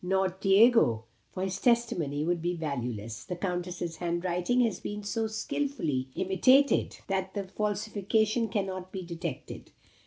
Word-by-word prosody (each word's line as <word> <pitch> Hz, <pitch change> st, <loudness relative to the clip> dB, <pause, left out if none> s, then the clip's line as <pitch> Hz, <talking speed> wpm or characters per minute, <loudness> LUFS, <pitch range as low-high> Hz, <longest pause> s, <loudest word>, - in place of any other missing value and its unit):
Not 190 Hz, 0 st, 0 dB
Diego; 195 Hz, -, +5 dB, 0.3 s
for 185 Hz, -, -4 dB
his 190 Hz, 0 st, -3 dB
testimony 175 Hz, -, +1 dB
would 175 Hz, 0 st, 0 dB
be 175 Hz, +1 st, -1 dB
valueless. 120 Hz, -8 st, -4 dB
The 180 Hz, -, -5 dB
Countess's 175 Hz, -2 st, -3 dB
hand 175 Hz, 0 st, -2 dB
writing 180 Hz, +8 st, +1 dB
has 230 Hz, -3 st, +1 dB
been 210 Hz, 0 st, -5 dB
so 220 Hz, +2 st, -1 dB
skilfully 220 Hz, -, -2 dB
imitated, 255 Hz, +9 st, +3 dB
that 190 Hz, 0 st, -2 dB
the 200 Hz, -, -1 dB
falsification 215 Hz, +3 st, 0 dB
cannot 190 Hz, -3 st, -3 dB
be 190 Hz, -2 st, -5 dB
detected. 170 Hz, -5 st, -6 dB
190 Hz, 135 wpm, -29 LUFS, 170-215 Hz, 0.3 s, Diego